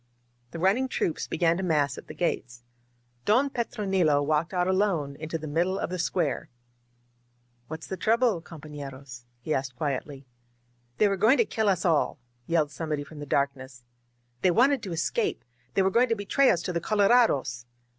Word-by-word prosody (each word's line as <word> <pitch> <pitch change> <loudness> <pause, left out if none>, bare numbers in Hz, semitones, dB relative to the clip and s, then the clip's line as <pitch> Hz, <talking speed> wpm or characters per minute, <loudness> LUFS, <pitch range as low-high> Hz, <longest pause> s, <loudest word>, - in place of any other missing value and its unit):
*' 120 0 -42
The - - -6
run 190 +6 +3
ning 260 +1 -1
troops 170 -9 -2
began 170 0 +1
to 190 - -3
mass 145 -5 +1
at - - -11
the - - -9
gates. 125 -8 -2 0.6
Don 255 - +3
Petro* 235 -4 -3
nilo 165 -7 +3
walked 155 +3 0
out 180 -1 0
alone 185 -7 +1
into 155 +1 -4
the 155 - -8
middle 175 +6 0
of - - -3
the 185 - -3
square. 170 -4 -1 1.2
"What's 160 +2 -7
the 190 - -5
trouble, 225 -4 +2
compoflerosf 140 -6 -10 0.2
he 155 - -2
asked 130 -1 -2
quietly. 140 0 -4 0.7
"They 210 - +4
were 195 -1 0
going 220 +8 +5
to 465 - +3
kill 220 - 0
us 185 -2 0
all!" 165 -4 +2 0.3
yelled 155 -3 +1
somebody 150 -1 -3
from 150 +1 -12
the 145 - -7
darkness. 135 -2 -2 0.6
"They 185 - +4
wanted 250 +7 +3
to 190 - -6
escape! 410 - -1 0.3
They 195 - +4
were 190 - +2
going 240 +4 +3
to 230 - +2
betray 225 +7 +2
us 170 - +2
to 180 - -3
the 170 - -1
colorados!" 200 - +2
170 Hz, 185 wpm, -27 LUFS, 145-200 Hz, 1.2 s, going